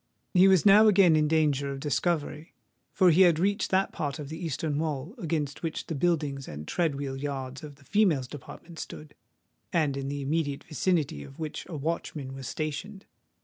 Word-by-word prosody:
He 185 Hz, 0 st, +7 dB
was 190 Hz, -2 st, +4 dB
now 210 Hz, +2 st, +8 dB
again 190 Hz, -5 st, +6 dB
in 155 Hz, -1 st, +3 dB
danger 145 Hz, -3 st, +1 dB
of 135 Hz, -, -5 dB
discovery; 155 Hz, +2 st, -2 dB, 0.4 s
for 185 Hz, -3 st, +5 dB
he 170 Hz, +4 st, +5 dB
had 175 Hz, -4 st, +6 dB
reached 200 Hz, +4 st, 0 dB
that 190 Hz, +1 st, +2 dB
part 145 Hz, -3 st, -3 dB
of 145 Hz, -2 st, -7 dB
the 160 Hz, +3 st, -7 dB
eastern 155 Hz, -1 st, -2 dB
wall 155 Hz, +2 st, -3 dB
against 155 Hz, -5 st, -2 dB
which 165 Hz, -2 st, -3 dB
the -, -, -4 dB
buildings 145 Hz, -4 st, 0 dB
and 75 Hz, +1 st, -8 dB
tread 165 Hz, -5 st, 0 dB
wheel 140 Hz, -1 st, -4 dB
yards 135 Hz, -2 st, -5 dB
of 145 Hz, -2 st, -9 dB
the 140 Hz, +1 st, -22 dB
females' 175 Hz, -11 st, +2 dB
department 160 Hz, +4 st, -11 dB
stood, 150 Hz, -1 st, -8 dB, 0.6 s
and 150 Hz, -5 st, +1 dB
in 135 Hz, 0 st, -4 dB
the 140 Hz, 0 st, -3 dB
immediate 145 Hz, -1 st, -1 dB
vicinity 155 Hz, -, -1 dB
of 135 Hz, -, -13 dB
which 155 Hz, -2 st, -5 dB
a 165 Hz, -, -5 dB
watchman 150 Hz, -3 st, -4 dB
was 135 Hz, -2 st, -7 dB
stationed. 155 Hz, +9 st, -5 dB
155 Hz, 190 wpm, -28 LUFS, 140-170 Hz, 0.6 s, now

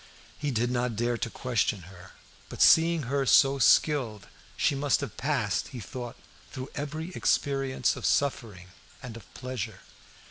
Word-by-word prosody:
He 145 Hz, -, -3 dB
did 120 Hz, -1 st, 0 dB
not 120 Hz, -2 st, -1 dB
dare 120 Hz, +2 st, 0 dB
to -, -, -2 dB
question 120 Hz, -4 st, -1 dB
her; 90 Hz, +1 st, -14 dB, 0.4 s
but, -, -, -9 dB
seeing 165 Hz, -1 st, +5 dB
her 135 Hz, +3 st, 0 dB
so 135 Hz, +1 st, +5 dB
skilled, 120 Hz, -, +3 dB, 0.3 s
she -, -, +2 dB
must 140 Hz, 0 st, +1 dB
have -, -, -6 dB
passed, -, -, -1 dB
he 125 Hz, -, -8 dB
thought, 120 Hz, +4 st, -7 dB, 0.4 s
through 130 Hz, 0 st, -7 dB
every 155 Hz, +4 st, -5 dB
experience 135 Hz, -5 st, 0 dB
of -, -, -9 dB
suffering 110 Hz, -10 st, -1 dB, 0.3 s
and 120 Hz, -3 st, -8 dB
of 115 Hz, -, -13 dB
pleasure. 125 Hz, -4 st, -5 dB
130 Hz, 150 wpm, -28 LUFS, 115-140 Hz, 0.4 s, seeing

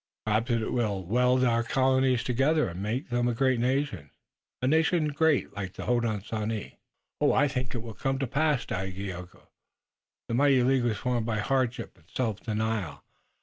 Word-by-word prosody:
Perhaps 110 Hz, +3 st, +1 dB
it 115 Hz, -2 st, 0 dB
will 105 Hz, -6 st, 0 dB
weld 125 Hz, +5 st, +3 dB
our 115 Hz, -2 st, +3 dB
colonies 130 Hz, 0 st, +2 dB
together 140 Hz, +5 st, +2 dB
and 90 Hz, +1 st, -6 dB
make 115 Hz, +7 st, -2 dB
of -, -, -27 dB
them 120 Hz, 0 st, +1 dB
a 120 Hz, -, 0 dB
great 130 Hz, 0 st, +2 dB
nation, 125 Hz, -, -1 dB, 0.5 s
a -, -, -2 dB
nation 160 Hz, +2 st, +2 dB
great 150 Hz, 0 st, +1 dB
like 95 Hz, -2 st, -5 dB
the -, -, -7 dB
Hodenosaunee." 110 Hz, -2 st, -2 dB, 0.4 s
"I 145 Hz, -, +4 dB
think 130 Hz, -2 st, -3 dB
it 115 Hz, -, -4 dB
will 115 Hz, -2 st, -7 dB
come 135 Hz, +4 st, -1 dB
to 135 Hz, -, -1 dB
pass, 145 Hz, 0 st, +1 dB
Dagaeoga. 95 Hz, -1 st, -6 dB, 0.8 s
The -, -, -4 dB
mighty 135 Hz, 0 st, +4 dB
League 130 Hz, -1 st, +2 dB
was 110 Hz, -3 st, 0 dB
formed 120 Hz, -3 st, -1 dB
by 110 Hz, -2 st, 0 dB
hardship 120 Hz, -1 st, -1 dB
and 80 Hz, -, -27 dB
self 110 Hz, -5 st, -2 dB
denial. 110 Hz, -7 st, -3 dB
120 Hz, 170 wpm, -28 LUFS, 110-130 Hz, 0.8 s, I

